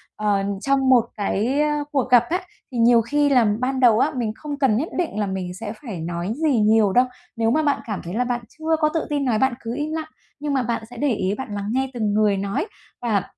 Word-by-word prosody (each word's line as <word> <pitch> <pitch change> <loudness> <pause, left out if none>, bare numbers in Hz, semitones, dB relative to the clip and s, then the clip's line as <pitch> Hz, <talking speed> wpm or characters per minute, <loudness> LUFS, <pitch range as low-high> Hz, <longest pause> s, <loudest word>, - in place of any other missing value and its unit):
ờ, 205 -2 +1 0.2
trong 275 0 +2
một 245 -3 +5
cái, 220 +7 0
ơ, 295 -1 +1
cuộc 275 -4 0
gặp 245 -2 +6
á, 360 +3 0 0.3
thì 250 - -5
nhiều 235 0 +5
khi 290 +5 +1
là 250 -4 +4
ban 260 +1 -1
đầu 235 -4 +5
á, - - +2
mình 235 -4 -1
không 290 +1 -6
cần 260 -7 +3
nhất 305 +8 -2
định 340 -11 -1
là 210 - +1
mình 190 -2 -4
sẽ 210 +3 -6
phải 220 - -6
nói 170 +4 -3
gì 285 -7 +3
nhiều 215 -2 +4
đâu, 250 +1 +5 0.3
nếu 225 0 +1
mà 310 +5 +2
bạn 285 -2 +1
cảm 210 -4 -4
thấy 175 0 -6
là 240 +4 +1
bạn 245 -1 -2
chưa 320 +1 -1
có 305 -1 +3
tự 325 - -1
tin 290 -2 0
nói, 230 -4 +2
bạn 265 +1 +2
cứ 230 -1 -5
im 295 +2 -3
lặng, 315 0 -4 0.3
nhưng 295 0 -2
mà 265 -2 +1
bạn 235 -1 -2
sẽ - - -11
để 285 -3 +1
ý 190 -2 -1
bạn 265 -6 -6
lắng 200 0 -4
nghe 265 +2 0
từng 215 -4 -1
người 210 -2 +3
nói 200 - -2 0.4
và 215 -6 +1
245 Hz, 255 wpm, -22 LUFS, 210-280 Hz, 0.4 s, gặp